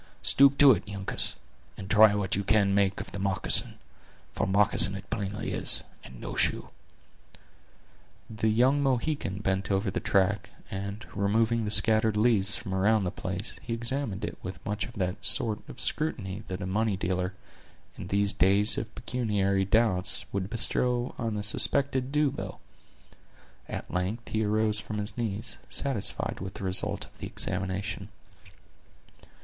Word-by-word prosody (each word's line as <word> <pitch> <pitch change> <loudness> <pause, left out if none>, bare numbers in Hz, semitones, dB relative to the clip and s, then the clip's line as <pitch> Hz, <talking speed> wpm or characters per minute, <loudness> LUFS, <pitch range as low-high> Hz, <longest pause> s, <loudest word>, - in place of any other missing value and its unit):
Stoop 140 0 +5
to 140 -2 +9
it, 110 - 0
Uncas, 100 -1 -1 0.4
and 95 - -7
try 105 0 +6
what 100 -2 -1
you 100 - -1
can 100 -1 +3
make 100 -1 +2
of - - -7
the 100 - -6
moccasin; 95 -1 +1 0.6
for - - -1
moccasin 100 0 +3
it 95 0 -8
plainly 105 -2 -3
is, - - -1 0.2
and 65 -1 -12
no - - -6
shoe." - - 0 1.6
The 110 0 -2
young 125 +6 +3
Mohican 130 -7 -1
bent 95 -1 -1
over 95 0 0
the - - -2
track, 100 +2 +1 0.2
and 100 +3 -5
removing 110 +3 +1
the - - -2
scattered 110 +1 +2
leaves 105 -3 +2
from 95 -4 -6
around 105 +3 +2
the 90 - -2
place, 95 +3 -4
he 115 - -3
examined 115 -3 -2
it - - -7
with 95 0 -8
much 105 +1 -2
of 120 - -12
that 90 -4 -3
sort 110 -2 +4
of - - -10
scrutiny 105 -11 -1
that 95 0 -5
a - - -3
money 105 +1 0
dealer, 95 +1 -2 0.6
in - - -8
these 100 +1 +1
days 100 +2 +3
of 110 -1 -7
pecuniary 100 -6 0
doubts, 100 -3 +1
would 100 -1 -2
bestow 120 +2 +2
on 115 -3 -2
a 105 - -3
suspected 130 +4 +1
due 150 -1 +2
bill. 140 - -7 1.1
At - - -6
length 95 +6 -2
he 110 0 0
arose 105 0 +1
from 110 0 -6
his 105 0 -4
knees, 110 -2 -3
satisfied 135 -8 0
with 95 +1 -7
the - - -7
result 95 0 0
of - - -22
the - - -5
examination. 95 +1 -2
105 Hz, 160 wpm, -28 LUFS, 95-115 Hz, 1.6 s, to